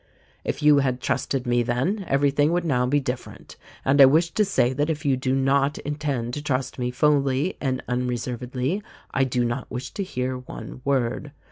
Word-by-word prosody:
If - - -3
you 150 -1 +6
had 130 -2 0
trusted 130 0 -1
me 120 0 +2
then, 130 - -1
everything 145 +2 +2
would 175 0 0
now 125 -5 +1
be 145 +3 +3
different; 125 -2 -6 0.3
and 140 +1 +5
I - - +12
wish 160 +5 +3
to 215 - +2
say 160 -11 +2
that 145 +3 0
if 155 0 -3
you 135 -2 +3
do 130 0 0
not 135 +1 +2
intend 140 -5 -3
to 145 - -3
trust 135 -3 -2
me 125 0 0
fully 140 +4 +2
and 130 -2 -1
unreservedly 125 - -2 0.3
I 135 - +3
do 125 -1 0
not 120 +2 -3
wish 125 +1 -5
to - - -4
hear 130 -7 -3
one 125 0 -9
word. 135 +1 -1
135 Hz, 190 wpm, -24 LUFS, 125-145 Hz, 0.3 s, I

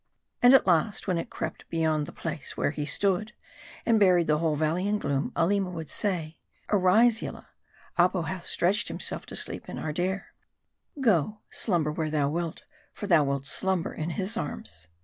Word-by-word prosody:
And 245 +2 +8
at - - +5
last, 185 +4 +1
when 180 -3 +1
it - - -5
crept - - -6
beyond 155 -2 0
the - - -8
place 155 -4 -6
where - - +1
he 150 -1 -4
stood, 200 +7 +2 0.5
and 230 -2 +4
buried 180 -4 +5
the 150 -1 +2
whole 160 -2 0
valr 155 +1 +1
ley 180 +3 -1
in 210 +1 +1
gloom; 140 -7 -1
Aleema 190 +3 +1
would 160 -3 -6
say, 170 -6 -2 0.3
"Arise 215 +4 +4
Yillah; - - -7 0.5
Apo 180 0 +3
hath 180 +1 -5
stretched 195 +5 +1
himself - - -2
to - - -7
sleep - - 0
in - - -6
Ardair. 180 +5 -3 0.7
Go, 210 - +1
slumber 170 -8 +1
where 155 0 -2
thou 145 -2 +1
wilt; 165 +1 -3 0.3
for 205 - -7
thou 170 -6 +5
wilt 140 -1 -2
slumber 185 +3 +1
in 155 +2 -4
his 195 +6 -1
arms." 80 - -5
175 Hz, 180 wpm, -27 LUFS, 155-200 Hz, 0.7 s, And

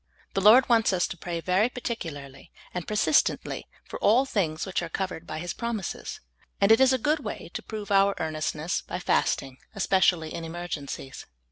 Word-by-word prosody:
The 195 - 0
Lord 225 +6 +7
wants 225 -4 +3
us 180 - +2
to - - -5
pray 170 0 -5
very 185 +7 +2
particularly 150 - -6 0.2
and 180 -2 -4
persistently 215 +7 +1 0.2
for - - -8
all 240 +6 +4
things 170 -11 -1
which 190 -2 -1
are 175 - -5
covered 180 -2 -4
by 155 - -5
His 175 +2 -4
promises, 230 -6 -4 0.4
and 200 +2 +4
it 225 - +6
is 265 -1 +6
a 260 - +3
good 295 +5 +1
way 220 - -7
to - - -4
prove 210 -2 -7
our 195 0 +4
earnestness 155 +1 -2
by - - -5
fasting, 130 -1 0 0.2
especially 185 -4 +2
in 165 - -5
emergencies. 160 -5 -6
185 Hz, 175 wpm, -27 LUFS, 160-220 Hz, 0.4 s, Lord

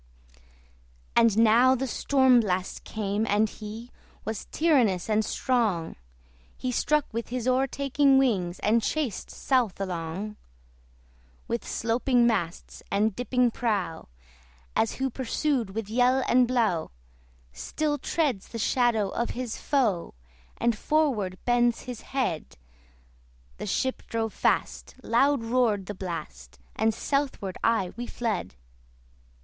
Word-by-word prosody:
And 230 -3 +4
now 230 +4 +6
the 265 +1 -2
STORM 260 0 +4
BLAST 185 -4 -2
came, 210 0 -2
and 210 +2 +3
he 220 +3 -9 0.3
Was 220 -2 -4
tyrannous 250 - +2
and 215 0 +2
strong: 215 -9 0 0.6
He 255 - -2
struck 300 +4 +1
with 230 +1 -4
his 250 0 -3
o'ertaking 270 +1 +3
wings, 190 -10 +1
And 225 +3 +3
chased 270 -3 -2
south 245 -9 0
along. 185 +3 -4 1.1
With - - -2
sloping 240 +2 +1
masts 175 -8 -2
and 210 0 +1
dipping 250 -1 +1
prow, 200 -9 -2 0.7
As 225 - +2
who 265 0 -2
pursued 260 -1 -1
with 225 -2 -3
yell 250 +4 +3
and 250 0 +4
blow 225 -10 +1 0.6
Still 290 - -2
treads 270 - -1
the 230 - -7
shadow 230 -2 +2
of 235 +4 -2
his 250 -3 -3
foe 220 - 0 0.4
And 235 -1 +1
forward 220 -9 0
bends 240 -1 +2
his 250 -3 -7
head, 250 - -3 1.0
The - - -6
ship 260 0 -1
drove 225 -2 -2
fast, - - -1
loud 270 +2 +2
roared 225 -4 +1
the 205 - -5
blast, 165 - -7 0.2
And 225 - +2
southward 260 -5 -2
aye 225 -6 +1
we 240 +1 -5
fled. 215 - -3
230 Hz, 120 wpm, -27 LUFS, 205-255 Hz, 1.1 s, now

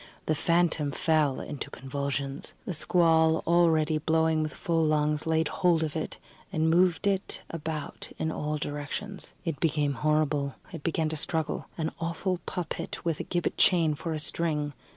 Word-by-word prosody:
The 155 - +2
phantom 165 -2 +2
fell 150 -3 +2
into 145 - -5
convulsions. 140 +2 -4
The 185 - -2
squall, 160 -1 +3
already 160 -2 +3
blowing 160 0 +2
with 155 -1 -1
full 165 -1 0
lungs, 150 0 +1
laid 160 0 +2
hold 170 -2 +2
of 155 -2 -3
it, 160 - -3 0.3
and 160 -3 +2
moved 180 +2 +3
it 195 -1 0
about 155 -2 -5
in 160 - -1
all 150 0 -2
directions. 145 +8 -5
It 160 -5 -2
became 150 -3 +1
horrible; 150 0 +1 0.2
it - - -6
began 160 0 0
to 160 - -2
struggle. 160 +1 -2
An 160 -1 -1
awful 170 +2 -1
puppet, 180 -2 -4
with 165 -3 0
a - - -2
gibbet 175 -1 -2
chain 165 -4 +5
for 165 +3 -4
a 155 - -1
string. 150 -1 0
160 Hz, 160 wpm, -28 LUFS, 150-165 Hz, 0.3 s, chain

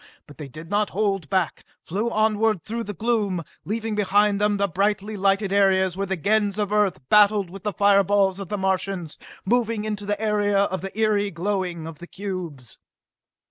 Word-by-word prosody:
But 145 - -16
they 150 - -6
did 155 +6 -11
not 205 0 +1
hold 195 -6 -1
back, 185 -3 0 0.2
flew 205 +7 -1
onward 215 -3 +1
through 230 +1 -4
the 205 - -6
gloom, 205 -4 0 0.2
leaving 225 +1 -2
behind 205 0 +2
them 210 0 +2
the 200 0 +1
brightly 200 +3 -1
lighted 195 0 +1
areas 190 -2 +3
where 195 +1 -2
Gens 200 +3 0
of 205 -1 -1
Earth 205 -6 +2
battled 205 -3 +4
with 195 0 -9
the 210 +2 -2
fireballs 200 -1 +3
of 195 -3 -7
the 210 - -2
Martians, 190 -3 -2 0.3
moving 230 0 0
into 210 -2 -4
the 205 0 -1
area 210 -2 +1
of 195 -1 +1
the 195 - -4
eery 210 -2 +2
glowing 180 -2 -3
of 160 -2 -9
the 175 - -10
cubes. 175 - -7
200 Hz, 180 wpm, -24 LUFS, 190-210 Hz, 0.3 s, battled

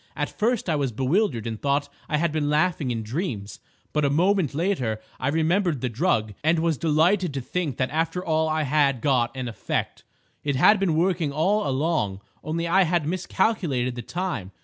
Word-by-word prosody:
At - - -2
first 230 -1 0
I 160 - +1
was 140 -4 0
bewildered 130 - 0
and 110 -2 -5
thought 140 0 +1 0.2
I 150 - +1
had 170 +1 +1
been 150 -1 -1
laughing 155 -2 +1
in 115 -2 -2
dreams, 110 - -4 0.3
but 150 - +1
a 140 - +3
moment 170 -1 +2
later 145 - 0 0.2
I 130 - -2
remembered 165 +1 +1
the 125 - -2
drug, 115 - 0
and 160 +2 +3
was 160 -3 0
delighted 165 +1 +2
to - - -1
think 150 -1 -3
that 130 - -1
after 165 +4 -1
all 160 -1 +1
I 155 0 0
had 140 -2 +2
got 125 -5 +2
an 130 -1 -3
effect. 115 - -3 0.4
It 145 -2 0
had 205 +10 +5
been 185 -5 +1
working 170 -3 +1
all 185 +7 +1
along, 135 - 0 0.2
only 165 +2 -2
I 185 +3 +4
had 175 -3 +1
miscalculated 170 - 0
the 120 - -6
time. 165 - -4
155 Hz, 190 wpm, -25 LUFS, 130-175 Hz, 0.4 s, had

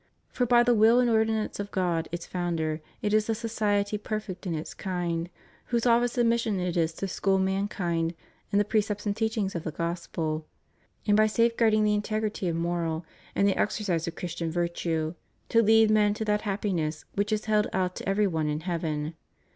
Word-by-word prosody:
For 245 - 0
by 240 0 +6
the 240 0 +4
will 225 +2 +5
and 250 - +3
ordinance 220 -1 +1
of 205 0 -3
God, 175 -4 -1
its 175 0 -4
Founder, 165 -3 -2 0.2
it 210 0 +1
is 215 +1 +2
a 225 - +2
society 210 -2 0
perfect 210 -3 -5
in 170 - -1
its 155 - -5
kind, 175 -2 -2 0.4
whose 235 -1 0
office 240 +1 +3
and 240 -1 +4
mission 230 -4 +1
it 180 -1 -2
is 165 -1 +2
to 195 - -4
school 195 +1 +1
mankind 190 -3 -1 0.4
in 200 - +2
the 205 - +3
precepts 210 -1 0
and 205 -1 0
teachings 220 -3 -1
of 170 - -4
the - - -3
Gospel, 165 -1 -3 0.6
and 205 - +4
by 215 +1 +5
safeguarding 230 -1 +3
the 210 0 +3
integrity 210 -1 -1
of 170 - 0
moral 165 -1 -1 0.3
and 200 - +3
the 200 - +3
exer 210 +2 -1
cise 170 -3 0
of 170 - -4
Christian 170 -1 -4
virtue, 170 -1 -1 0.4
to 230 - +5
lead 220 0 +5
men 210 -1 +4
to 220 - -3
that 210 0 +1
happiness 185 -7 -2
which 205 +2 -1
is 215 0 0
held 215 -1 +2
out 185 -1 -1
to - - -4
every 205 +2 +3
one 160 -5 0
in 150 +1 -2
heaven. 160 -3 -2
200 Hz, 195 wpm, -27 LUFS, 170-215 Hz, 0.6 s, by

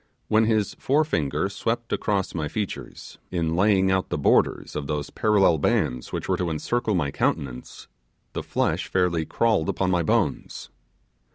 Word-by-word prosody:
When 110 +1 +4
his 110 -2 +1
forefinger 95 - +1
swept 115 +4 -3
across 100 -3 -1
my 80 -3 -2
features, 105 +5 -6
in 85 -2 -1
laying 95 0 +3
out 95 0 0
the - - -1
borders - - +2
of 75 -2 -3
those 75 -1 -3
parallel 100 -7 +3
bands 60 -3 0
which - - -4
were - - +1
to 90 -2 -1
encircle 110 +7 -1
my 75 -6 0
countenance, 65 -3 -3 0.5
the - - -3
flesh - - -1
fairly 90 -3 +1
crawled 110 -8 +1
upon 95 -1 0
my 90 -1 +2
bones. 80 - -1
95 Hz, 155 wpm, -24 LUFS, 80-105 Hz, 0.5 s, When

